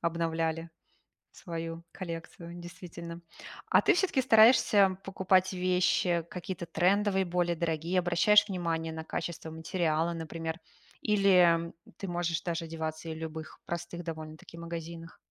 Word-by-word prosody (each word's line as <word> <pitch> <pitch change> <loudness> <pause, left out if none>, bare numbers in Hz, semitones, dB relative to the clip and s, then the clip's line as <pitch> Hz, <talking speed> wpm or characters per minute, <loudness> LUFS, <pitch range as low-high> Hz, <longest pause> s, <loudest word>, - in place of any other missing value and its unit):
обновляли 165 0 -1 0.6
свою 165 -2 -6
коллекцию, 170 -1 -7
действительно. 170 -1 -9 0.5
А - - +6
ты - - +4
всё-таки 350 -7 +2
стараешься 220 -5 +6
покупать 190 -1 +2
вещи 180 -2 +1
какие-то 180 0 -5
трендовые, 190 +3 +2
более 175 0 0
дорогие, 165 +2 0
обращаешь 180 +5 +4
внимание 165 -4 -2
на 160 - -5
качество 165 0 -5
материала, 160 0 0
например, 165 0 -5 0.4
или 180 -5 +4 0.2
ты 195 - -5
можешь 175 -2 -1
даже 170 -2 -2
одеваться 160 0 -5
и - - -3
в - - -8
любых 160 0 -7
простых 170 0 -5
довольно-таки 160 0 -8
магазинах? 165 0 -7
170 Hz, 120 wpm, -30 LUFS, 165-185 Hz, 0.6 s, А